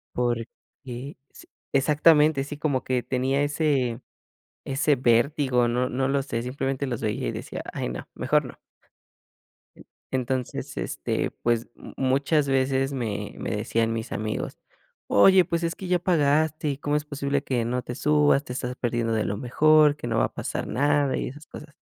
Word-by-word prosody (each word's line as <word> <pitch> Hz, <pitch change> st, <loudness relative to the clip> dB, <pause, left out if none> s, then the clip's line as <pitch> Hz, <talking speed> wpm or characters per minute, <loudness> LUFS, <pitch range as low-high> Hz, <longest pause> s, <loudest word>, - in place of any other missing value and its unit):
Porque 120 Hz, -2 st, 0 dB, 0.9 s
s -, -, -15 dB, 0.2 s
exactamente, 150 Hz, +1 st, +4 dB
sí, 145 Hz, +1 st, -7 dB
como 145 Hz, -4 st, -1 dB
que 130 Hz, -1 st, 0 dB
tenía 135 Hz, +2 st, 0 dB
ese 145 Hz, -5 st, 0 dB, 0.6 s
ese 140 Hz, +2 st, +1 dB
vértigo, 125 Hz, +1 st, +2 dB
no 125 Hz, +2 st, 0 dB
no 130 Hz, +1 st, -1 dB
lo 140 Hz, 0 st, +1 dB
sé, 115 Hz, -4 st, -3 dB
simplemente 135 Hz, +2 st, -2 dB
los 120 Hz, -3 st, -3 dB
veía 110 Hz, -1 st, -2 dB
y -, -, -2 dB
decía: -, -, -6 dB
"Ay, -, -, -3 dB
no, 60 Hz, -, -6 dB
mejor -, -, +1 dB
no". -, -, -9 dB, 1.6 s
Entonces, 130 Hz, -1 st, -2 dB
este, -, -, -2 dB
pues, 115 Hz, -1 st, 0 dB
mu -, -, -12 dB
muchas 140 Hz, +3 st, +2 dB
veces 135 Hz, 0 st, +1 dB
me 105 Hz, -6 st, -3 dB
me -, -, -4 dB
decían 115 Hz, +2 st, 0 dB
mis 115 Hz, -1 st, -4 dB
amigos: 110 Hz, 0 st, -3 dB, 0.5 s
"Oye, 185 Hz, -, +6 dB
pues 170 Hz, 0 st, -2 dB
es 165 Hz, 0 st, 0 dB
que 190 Hz, -, -8 dB
ya 180 Hz, 0 st, +2 dB
pagaste, 155 Hz, -2 st, +2 dB
¿y 135 Hz, -, -5 dB
cómo 145 Hz, +1 st, 0 dB
es 150 Hz, -, -4 dB
posible 140 Hz, -1 st, -2 dB
que 125 Hz, -5 st, -1 dB
no 125 Hz, +2 st, -1 dB
te 120 Hz, -, -6 dB
subas? 150 Hz, 0 st, +3 dB
Te 125 Hz, -, -9 dB
estás 125 Hz, 0 st, -4 dB
perdiendo 120 Hz, -2 st, -1 dB
de 110 Hz, -1 st, +1 dB
lo 100 Hz, -, -2 dB
mejor, 150 Hz, +5 st, +4 dB
que 135 Hz, -, -7 dB
no 115 Hz, -1 st, 0 dB
va -, -, +3 dB
a -, -, -6 dB
pasar -, -, -4 dB
nada", 145 Hz, 0 st, +1 dB
y -, -, -2 dB
esas 150 Hz, +4 st, -12 dB
cosas. 150 Hz, 0 st, -11 dB
135 Hz, 175 wpm, -25 LUFS, 120-145 Hz, 1.6 s, Oye